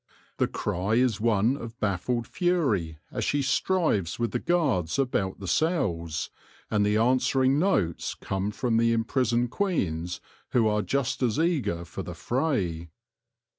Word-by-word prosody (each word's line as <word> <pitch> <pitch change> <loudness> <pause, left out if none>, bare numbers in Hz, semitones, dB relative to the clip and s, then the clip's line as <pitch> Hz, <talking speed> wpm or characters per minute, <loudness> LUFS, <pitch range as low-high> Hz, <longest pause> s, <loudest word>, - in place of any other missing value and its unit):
The - - +2
cry 95 +5 -1
is 120 -3 +2
one 115 +2 +3
of 115 -3 -8
baffled 105 +5 -1
fury 135 - 0
as - - -2
she 145 -1 +1
strives 130 - +1
with 120 -1 -1
the 125 - -1
guards 140 - +1
about 125 -8 0
the 95 - -6
cells, 85 - 0 0.4
and 105 -1 +2
the 105 +1 +2
answering 130 +3 +3
notes 105 - 0
come 95 +1 -3
from 115 +2 0
the 115 0 +3
imprisoned 120 +1 +1
queens 90 - -1 0.3
who 115 -3 +4
are 105 0 +2
just 135 +2 -1
as 120 -4 +1
eager 130 - 0
for 85 +3 -6
the 90 -2 -7
fray. 95 - -1
115 Hz, 145 wpm, -27 LUFS, 95-135 Hz, 0.4 s, who